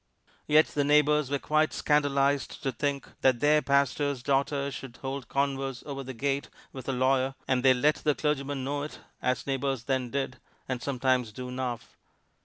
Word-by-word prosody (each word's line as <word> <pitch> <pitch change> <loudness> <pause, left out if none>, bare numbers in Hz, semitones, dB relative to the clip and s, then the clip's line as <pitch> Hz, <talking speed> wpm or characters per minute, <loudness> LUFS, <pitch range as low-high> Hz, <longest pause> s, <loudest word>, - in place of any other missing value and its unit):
Yet 155 +1 +6
the 145 - 0
neighbors 150 0 +3
were 140 - +1
quite 155 +2 +1
scandalized 140 -1 +1
to 135 - 0
think 140 +2 -2
that 130 -2 +4
their 150 +2 +4
pastor's 140 -1 +1
daughter 140 0 +1
should 130 -2 -8
hold 135 -2 -4
converse 135 -2 -1
over 140 -2 -5
the 130 0 -7
gate 140 +3 -1 0.2
with 130 0 -7
a - - +2
lawyer, 130 +1 +1
and 130 -1 +2
they 130 0 +5
let 150 +5 +3
the 150 -2 +1
clergyman 140 -2 -1
know 145 +2 -2
it 150 - -6 0.2
as 125 -2 0
neighbors 135 -2 -1
then 130 -1 -1
did, 135 +1 -3 0.3
and 130 -2 -3
sometimes 130 -3 0
do 125 +3 -7
now. 125 -2 -2
135 Hz, 175 wpm, -28 LUFS, 130-145 Hz, 0.3 s, Yet